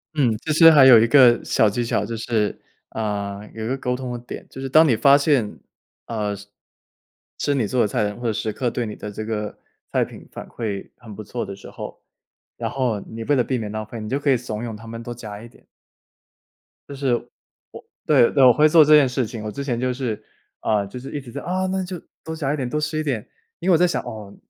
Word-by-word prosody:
嗯， 125 -7 +2
其 155 - -4
实 165 +2 +8
还 145 -4 +7
有 120 -4 +9
一 115 - +3
个 125 -2 +6
小 110 - +3
技 120 +4 -2
巧， - - 0
就 115 - -5
是， 110 -2 -1 0.3
啊， 100 -2 -3
有 110 - -6
一 - - -3
个 130 +3 -1
沟 125 -2 -2
通 125 -1 -5
的 120 - -4
点， 120 - -9
就 - - -10
是 135 - -4
当 155 +5 +6
你 130 - +4
发 140 +5 +6
现， 140 -7 +1 0.5
啊， 105 -3 -3
是 100 +1 -12 0.9
吃 145 - 0
你 125 -5 +1
做 125 +4 0
的 - - +3
菜 105 - 0
的 105 - 0
人 105 - -9
会 120 -2 -1
时 110 +1 -2
刻 125 +3 -1
对 120 +1 -3
你 105 - -5
的 105 - -7
这 105 +1 -6
个 105 -1 -4 0.3
菜 - - +1
品 - - -10
反 - - -9
馈 105 -4 -5
很 110 -4 -11
不 110 - -8
错 120 +4 -4
的 100 0 -7
时 100 - -12
候， - - -9 0.6
然 - - -3
后 125 -6 -1
你 115 0 -7
为 145 +4 +2
了 125 - +3
避 130 +1 -1
免 110 -3 -5
浪 110 0 -4
费， 110 +1 -8
你 105 - -6
就 135 - 0
可 145 - -1
以 135 - +5
怂 115 -3 -5
恿 115 -2 -5
他 110 +2 -12
们 115 0 -7
多 120 +1 -6
夹 105 -3 -8
一 115 - -10
点。 120 - -22 1.2
就 140 - -7
是， 140 0 -6 0.8
我 130 -6 +2
对， 140 - +4
我 125 -1 +8
会 150 +4 +5
做 160 0 +7
这 150 +1 +6
件 145 -3 +6
事 125 0 -1
情。 110 0 -7
我 105 - -4
之 140 - -5
前 125 -4 -2
就 125 0 0
是， 120 -5 -3 0.4
啊， 105 -2 0
就 115 +6 -8
是 135 - -9
一 145 - -3
直 125 -3 -12
在： - - -6
“啊， 185 +1 -1
那 190 0 -1
就 180 -1 -6 0.2
多 160 - -5
夹 145 -3 -1
一 - - 0
点， 130 -4 -3
多 150 - -1
吃 150 +1 -2
一 - - -1
点。” 130 -8 -3 0.3
因 180 - -1
为 - - +6
我 - - +6
在 180 +2 +4
想， 175 - -1
哦， 105 -2 -9
120 Hz, 275 characters per minute, -22 LUFS, 110-140 Hz, 1.2 s, 有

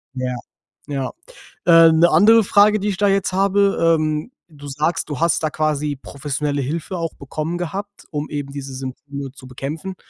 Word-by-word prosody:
Ja. 130 -1 -2 0.5
Ja. 140 -3 -3 0.5
Äh, 165 -1 +7
'ne 165 +2 +5
andere 225 +4 +6
Frage, 210 +1 +4
die 205 - -2
ich 195 - -2
da 205 - +2
jetzt 195 -1 +1
habe, 200 +1 +2 0.2
ähm, 155 +7 -2 0.2
du 145 -3 -12
sagst, 150 +5 -1
du 145 - -4
hast 170 -1 +1
da 155 - +1
quasi 150 -1 -1
professionelle 145 0 -3
Hilfe 160 +7 -4
auch 165 -2 -3
bekommen 155 +5 -4
gehabt, 195 +4 -6
um 150 -1 -4
eben 145 -2 -5
diese 140 -1 -7
Symptome 135 +1 -7
zu 130 -2 -13
bekämpfen 150 +9 -6
155 Hz, 170 wpm, -20 LUFS, 140-185 Hz, 0.5 s, Äh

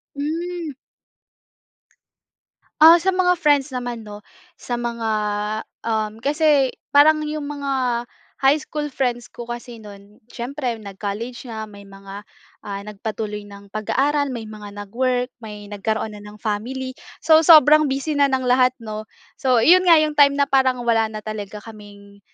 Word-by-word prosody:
Hmm. 325 +2 -4 2.1
Ah, 330 +2 +10
sa 380 +2 0
mga 360 -1 +2
friends 290 -3 +2
naman 245 -2 -5
'no, 210 -1 -11 0.3
sa 245 - -6
mga 235 -2 -3 0.8
um, 220 -1 -1
kasi 290 -2 +2 0.2
parang 305 +2 +5
yung 300 -1 -4
mga 265 -4 -2 0.4
high 280 +3 +5
school 295 -1 -5
friends 240 -3 -2
ko 240 -1 -9
kasi 240 -1 -7
no'n, 205 0 -14
siyempre 250 0 -4
nag-college 215 +4 -6
na, 220 -1 -5
may 200 -2 -12
mga, 195 +1 -11 0.4
ah, 200 -1 -5
nagpatuloy 210 0 -6
ng 200 0 -14
pag-aaral, 275 +5 0
may 225 - -5
mga 210 -1 -10
nag-work, 250 +3 -1
may 210 -2 -9
nagkaroon 215 +1 -2
na 210 - -10
ng 210 0 -12
family. 250 +5 -3 0.3
So 315 -1 +6
sobrang 305 -2 +7
busy 280 +2 -2
na 280 - +5
ng 265 -1 -1
lahat 255 0 +3
'no. 215 0 -6 0.3
So 255 -5 +3
yun 365 +4 +6
nga 335 - +8
yung 305 -1 -1
time 280 -1 +6
na 285 - +3
parang 260 -2 +2
wala 225 -2 +2
na 215 -1 -7
talaga 210 -1 -6
kaming, 205 -2 -14
245 Hz, 150 wpm, -21 LUFS, 215-285 Hz, 2.1 s, Ah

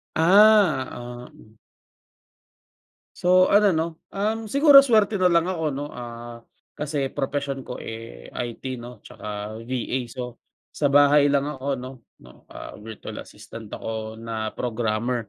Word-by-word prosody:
Ah, 185 -5 +5
oo. 120 -2 -11 1.6
So 185 +1 +4
ano 205 0 +6
'no, 160 - +1 0.2
um, 215 +2 -2
siguro 280 +2 +8
swerte 220 -6 +2
na 180 - +5
lang 170 -1 +3
ako 175 -3 -3
'no, 140 +1 -4
ah, 120 -1 -8 0.3
kasi 145 -2 -3
propesyon 140 -1 -3
ko, 125 - -7
eh, 110 - -9
IT 125 +1 -5
'no 120 -2 -11
tsaka 105 +1 -7
VA, 125 +1 -3
so 125 0 -8 0.3
sa 145 - +1
bahay 145 +1 +5
lang 140 0 +2
ako 140 -2 -3
'no, 130 +1 -7 0.3
'no, 65 - -18
ah, - - -9
virtual 110 0 -8
assistant 110 -2 -11
ako 110 0 -6
na 110 -1 -4
programmer. 115 0 -2
130 Hz, 135 wpm, -24 LUFS, 115-165 Hz, 1.6 s, siguro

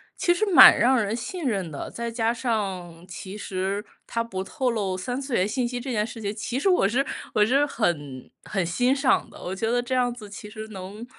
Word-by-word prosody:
其 350 - +2
实 350 - -2
蛮 345 - +10
让 255 +2 +4
人 210 0 -1
信 285 +8 -5
任 195 -9 -1
的， 140 - -6
再 235 0 -4
加 230 0 0
上 190 -8 -3
其 190 +2 -8
实 195 +1 -3 0.2
他 230 - -1
不 190 -5 -5
透 250 +5 -1
露 195 -5 -2
三 245 +8 -3
次 270 -3 -3
元 185 -1 +2
信 240 +3 -1
息 245 0 -4
这 255 +2 -5
件 210 -3 +1
事 230 - -9
情， 205 -2 -3
其 235 +4 -3
实 340 - 0
我 355 - +3
是 260 +5 +1 0.3
我 210 - +5
是 270 +6 +3
很 145 - -2
很 195 -4 -1
欣 245 +10 +2
赏 275 -2 +2
的。 - - -14
我 180 - -4
觉 225 +4 -2
得 245 +1 +2
这 245 +1 -3
样 250 -1 +2
子 235 -3 -9
其 205 +1 -9
实 215 0 -8
能 200 +3 -8
225 Hz, 245 characters per minute, -25 LUFS, 195-245 Hz, 0.3 s, 蛮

